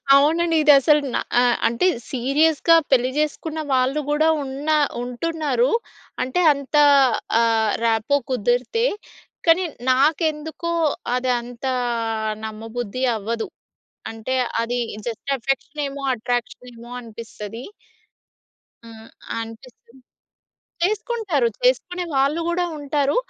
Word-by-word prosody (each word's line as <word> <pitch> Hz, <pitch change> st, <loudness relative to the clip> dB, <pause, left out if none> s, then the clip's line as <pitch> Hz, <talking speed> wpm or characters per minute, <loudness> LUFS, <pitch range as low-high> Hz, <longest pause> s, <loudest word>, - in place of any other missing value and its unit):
అవునండి. 325 Hz, +4 st, +3 dB
ఇదసలు 295 Hz, +1 st, +6 dB
న -, -, +1 dB, 0.2 s
ఆహ్, 245 Hz, -1 st, +3 dB
అంటే 235 Hz, +11 st, +1 dB, 0.2 s
సీరియస్‌గా 295 Hz, +6 st, +3 dB, 0.2 s
పెళ్లి 255 Hz, 0 st, +3 dB
జేసుకున్న 305 Hz, +1 st, -2 dB
వాళ్ళు 260 Hz, +4 st, +1 dB
కూడా 305 Hz, +2 st, +2 dB, 0.2 s
ఉన్నా 285 Hz, +3 st, -1 dB, 0.3 s
ఉంటున్నారు. 320 Hz, -, -1 dB, 0.5 s
అంటే 260 Hz, +8 st, -1 dB
అంత 280 Hz, +1 st, -6 dB, 0.6 s
ఆహ్, 225 Hz, -2 st, +2 dB
ర్యాపో 230 Hz, +5 st, +2 dB
కుదిరితే. 245 Hz, -, 0 dB, 0.6 s
కానీ 340 Hz, +3 st, +5 dB, 0.3 s
నాకెందుకో 315 Hz, +4 st, 0 dB, 0.4 s
అదంత 245 Hz, 0 st, -2 dB, 0.8 s
నమ్మబుద్ధి 225 Hz, +2 st, -5 dB
అవ్వదు. 225 Hz, +2 st, -3 dB, 0.6 s
అంటే 225 Hz, +4 st, -4 dB, 0.3 s
అది 245 Hz, +1 st, -2 dB, 0.6 s
అఫెక్షనేమో 275 Hz, +2 st, -3 dB
అట్రాక్షనేమో 240 Hz, 0 st, -5 dB
అనిపిస్తది. 225 Hz, 0 st, -9 dB, 1.2 s
ఆహ్, 225 Hz, 0 st, -13 dB, 0.3 s
అనిపిస్తుంది. 235 Hz, +2 st, -11 dB, 0.8 s
చేసుకుంటారు. 405 Hz, -, 0 dB, 0.2 s
చేసుకునే 360 Hz, -8 st, +1 dB
వాళ్ళు 280 Hz, +5 st, +2 dB
కూడా 350 Hz, +1 st, 0 dB
ఉంటారు. 285 Hz, -, 0 dB
270 Hz, 90 wpm, -22 LUFS, 235-310 Hz, 1.2 s, ఇదసలు